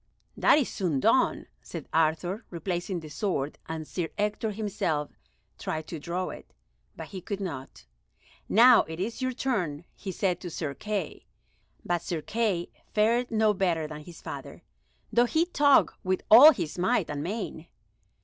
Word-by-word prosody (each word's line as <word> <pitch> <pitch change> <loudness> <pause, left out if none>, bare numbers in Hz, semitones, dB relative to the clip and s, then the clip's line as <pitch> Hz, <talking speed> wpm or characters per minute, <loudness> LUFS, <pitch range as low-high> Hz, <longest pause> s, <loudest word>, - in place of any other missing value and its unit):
"That - - +5
is 285 - +2
soon 170 -9 -1
done," - - +2 0.2
said - - -8
Arthur, 165 +6 +1
replacing 175 +1 -3
the 155 - -10
sword, 150 -4 -2
and 160 -1 -5
Sir 170 -3 -3
Ector 210 +1 -1
himself 195 -8 -2 0.5
tried 155 0 -3
to 165 - -5
draw 175 +4 -3
it, - - -10 0.4
but - - -8
he 190 -2 -7
could 200 +2 -4
not. 150 -9 -7 0.6
"Now 240 +3 +7
it 160 +1 -7
is 225 +7 -3
your 255 0 0
turn," 180 - -2
he 195 - -6
said 180 -1 0
to 180 - -5
Sir 155 -3 -4
Kay, 205 -1 -4 0.6
but 175 -1 0
Sir 170 -3 -4
Kay 210 -6 -1 0.2
fared 235 +4 +3
no 220 -2 +3
better 175 -5 0
than 150 0 -7
his 170 +2 -13
father, - - -8 0.5
though 240 +1 +5
he 315 +7 +2
tugged 290 -5 +4
with 185 0 -1
all 265 +8 +11
his 175 - -4
might 185 - +2
and 145 -1 -4
main. 175 -2 -5
185 Hz, 160 wpm, -28 LUFS, 160-215 Hz, 0.6 s, all